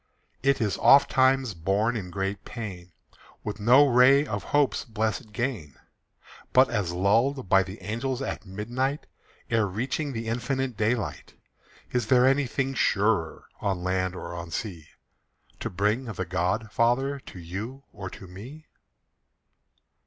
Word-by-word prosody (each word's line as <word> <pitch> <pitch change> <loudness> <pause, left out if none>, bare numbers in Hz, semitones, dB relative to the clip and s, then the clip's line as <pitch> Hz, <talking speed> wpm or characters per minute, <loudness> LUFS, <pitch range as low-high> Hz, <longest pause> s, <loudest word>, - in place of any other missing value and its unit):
It 140 0 +2
is 105 -4 -1
oftentimes 130 -3 +5
born 100 +7 0
in 95 -5 -4
great 95 +1 -3
pain, 95 -7 -7 0.5
With 105 0 -5
no 125 +7 +6
ray 135 +2 +5
of - - -4
hope's 145 -2 +1
blessed 110 -1 -3
gain. 105 - -3 0.8
But 130 0 +5
as 105 -7 -1
lulled 110 +8 +1
by 95 +1 +5
the 95 +3 -7
angels 120 +5 -2
at 135 - -4
midnight 120 +9 -3 0.5
Ere 115 -2 +2
reaching 130 +9 -2
the 115 -2 -5
infinite 125 +2 -2
daylight 110 +2 -2 0.6
Is 120 -3 0
there 125 +1 +5
anything 135 0 +1
surer, 100 -8 +1 0.2
On 95 -3 -1
land 95 0 -1
or 85 -1 -7
on 85 0 -6
sea, 85 -3 -5 0.7
To - - -3
bring 105 +7 0
the 95 -5 -4
God 95 +5 -1
Father 135 +5 +1
To 115 - -12
you 105 +11 -6
or 95 -3 -6
to 95 - -11
me? 120 - -11
110 Hz, 140 wpm, -26 LUFS, 95-130 Hz, 0.8 s, no